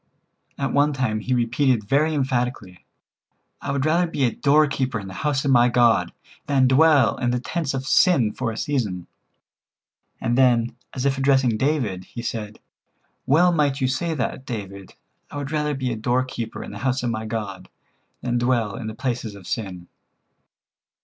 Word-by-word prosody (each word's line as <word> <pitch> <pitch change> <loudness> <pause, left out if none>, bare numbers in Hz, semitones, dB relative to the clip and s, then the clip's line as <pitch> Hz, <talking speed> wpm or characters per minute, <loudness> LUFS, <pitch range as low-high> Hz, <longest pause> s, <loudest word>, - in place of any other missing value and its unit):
At 140 -3 -1
onetime 135 -6 +1
he 125 +3 0
repeated 120 0 +1
very 155 +5 +2
emphatically: 125 -8 -2 0.7
"I 140 - -3
would 140 -1 -1
rather 170 +3 +2
be 145 -4 -2
a 120 - +3
doorkeeper 140 -4 +2
in 95 - -8
the 95 - -8
house 145 -2 0
of 140 - +2
my 120 -1 +5
God 115 -7 +3 0.4
than 135 -2 +3
dwell 140 -2 +4
in 120 - 0
the 125 0 0
tents 150 +1 -3
of 130 0 -4
sin 140 - +3
for 120 -3 -2
a 110 - -7
season," 105 -13 -2 1.1
and 120 +1 0
then, 120 -3 +3 0.2
as 130 0 -2
if 135 -1 +1
addressing 135 -4 +3
David, 115 -8 -1
he 120 - -8
said: 110 -2 -5 0.7
"Well 175 +6 +5
might 145 -4 +1
you 130 - +1
say 160 +6 -1
that, 130 -1 -3
David. 100 -7 -7 0.3
I - - -7
would 140 0 -5
rather 150 -1 0
be 130 -2 -2
a - - -5
doorkeeper 120 0 -2
in - - -8
the 100 - -8
house 130 0 -1
of 120 - 0
my 110 -1 -4
God 105 -4 -5 0.5
than 120 -1 -1
dwell 120 -4 0
in 110 - -6
the 110 - -6
palaces 120 -4 -3
of 100 -3 -13
sin." 90 -5 -5
125 Hz, 175 wpm, -23 LUFS, 115-140 Hz, 1.1 s, my